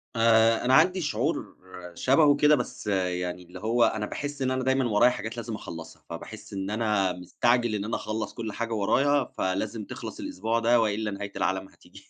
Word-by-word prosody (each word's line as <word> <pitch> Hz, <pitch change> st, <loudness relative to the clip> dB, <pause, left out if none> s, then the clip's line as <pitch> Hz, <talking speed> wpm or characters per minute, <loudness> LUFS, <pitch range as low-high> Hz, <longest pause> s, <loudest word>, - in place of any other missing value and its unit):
آآ، 115 Hz, 0 st, +4 dB
أنا 130 Hz, -, +3 dB
عندي 180 Hz, +6 st, +5 dB
شعور 145 Hz, +1 st, -2 dB, 0.4 s
شَبهه 145 Hz, -, +4 dB
كده، 150 Hz, +1 st, +5 dB
بس 125 Hz, -4 st, -5 dB
يعني 90 Hz, -2 st, -1 dB
اللي 90 Hz, +1 st, -11 dB
هو 115 Hz, +4 st, +2 dB
أنا 110 Hz, -2 st, +1 dB
باحِس 145 Hz, +5 st, -5 dB
إن 130 Hz, -1 st, +1 dB
أنا 130 Hz, 0 st, -1 dB
دايمًا 130 Hz, 0 st, +2 dB
ورايا 115 Hz, +3 st, +5 dB
حاجات 110 Hz, -1 st, -6 dB
لازم 115 Hz, -1 st, -4 dB
أخلّصها. 85 Hz, -5 st, -9 dB
فباحِس 105 Hz, +6 st, -9 dB
إن 95 Hz, 0 st, -3 dB
أنا 105 Hz, -4 st, +1 dB
مستعجل 120 Hz, +6 st, +1 dB
إن 100 Hz, -1 st, -3 dB
أنا 110 Hz, -, -2 dB
أخلّص 110 Hz, 0 st, -4 dB
كل 115 Hz, -2 st, -5 dB
حاجة 115 Hz, +1 st, -3 dB
ورايا، 135 Hz, +7 st, +2 dB
فلازم 100 Hz, +3 st, -2 dB
تخلص -, -, -8 dB
الأسبوع 110 Hz, +5 st, -2 dB
ده 115 Hz, +1 st, +4 dB
وإلّا 105 Hz, 0 st, -1 dB
نهاية 100 Hz, +1 st, -6 dB
العالم 95 Hz, 0 st, -1 dB
هتيجي. -, -, -18 dB
110 Hz, 185 wpm, -27 LUFS, 100-125 Hz, 0.4 s, عندي